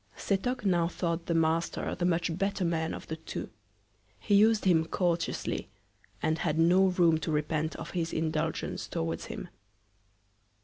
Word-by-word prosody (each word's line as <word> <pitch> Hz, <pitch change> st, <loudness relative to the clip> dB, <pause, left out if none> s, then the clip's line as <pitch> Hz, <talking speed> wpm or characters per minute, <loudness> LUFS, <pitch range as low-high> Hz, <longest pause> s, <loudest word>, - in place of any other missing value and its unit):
Setoc 210 Hz, +4 st, -1 dB
now 175 Hz, -3 st, +3 dB
thought 170 Hz, -1 st, -2 dB
the 170 Hz, -, +1 dB
Master 165 Hz, +1 st, +1 dB
the 175 Hz, -, -2 dB
much 170 Hz, -1 st, +1 dB
better 195 Hz, 0 st, -1 dB
Man 165 Hz, -1 st, -1 dB
of -, -, -9 dB
the 160 Hz, -, -5 dB
two. 160 Hz, -, -6 dB, 0.7 s
He 205 Hz, -, +4 dB
us'd 220 Hz, -2 st, +3 dB
him 165 Hz, -4 st, +4 dB
courteously, 170 Hz, 0 st, -1 dB, 0.5 s
and 160 Hz, +1 st, +1 dB
had 160 Hz, -2 st, 0 dB
no 180 Hz, +4 st, +5 dB
Room 175 Hz, -3 st, +3 dB
to 160 Hz, -, -3 dB
repent 155 Hz, +1 st, -1 dB
of -, -, -7 dB
his 165 Hz, -2 st, -2 dB
Indulgence 160 Hz, -1 st, -2 dB
towards 80 Hz, 0 st, -3 dB
him. -, -, -7 dB
170 Hz, 150 wpm, -30 LUFS, 160-180 Hz, 0.7 s, no